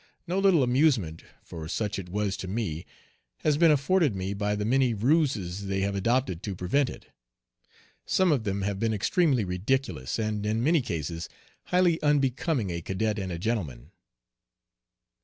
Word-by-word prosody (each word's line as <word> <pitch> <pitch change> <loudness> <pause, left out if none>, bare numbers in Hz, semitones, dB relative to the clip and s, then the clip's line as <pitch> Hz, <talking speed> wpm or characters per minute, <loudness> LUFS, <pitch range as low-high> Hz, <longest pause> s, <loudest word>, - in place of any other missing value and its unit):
No 180 +2 -1
little 190 -7 +4
amusement 125 - +2 0.2
for 80 -2 -8
such 105 +5 -2
it 90 -2 -8
was 100 0 -1
to 95 - -6
me 95 -5 -3 0.5
has 150 -2 +2
been 165 +2 +5
afforded 150 - +3
me 95 +1 -3
by 105 +1 -1
the 105 0 -2
many 125 0 +2
ruses 105 - 0
they 95 0 -1
have 100 +1 0
adopted 105 -2 0
to 100 -3 -4
prevent 125 +11 +1
it. - - -11 1.0
Some 185 -2 +3
of 135 -7 +1
them 100 -2 -2
have 100 0 -2
been 110 0 0
extremely 135 - +2
ridiculous, 90 - -1
and 110 -2 -2
in 110 +2 0
many 160 +2 +3
cases 85 - -4 0.4
highly 180 -2 +2
unbecoming 140 - +1
a 85 0 -4
cadet 105 +5 -1
and 95 -2 -4
a 85 - -3
gentleman. 85 - -3
105 Hz, 160 wpm, -27 LUFS, 95-140 Hz, 1.0 s, been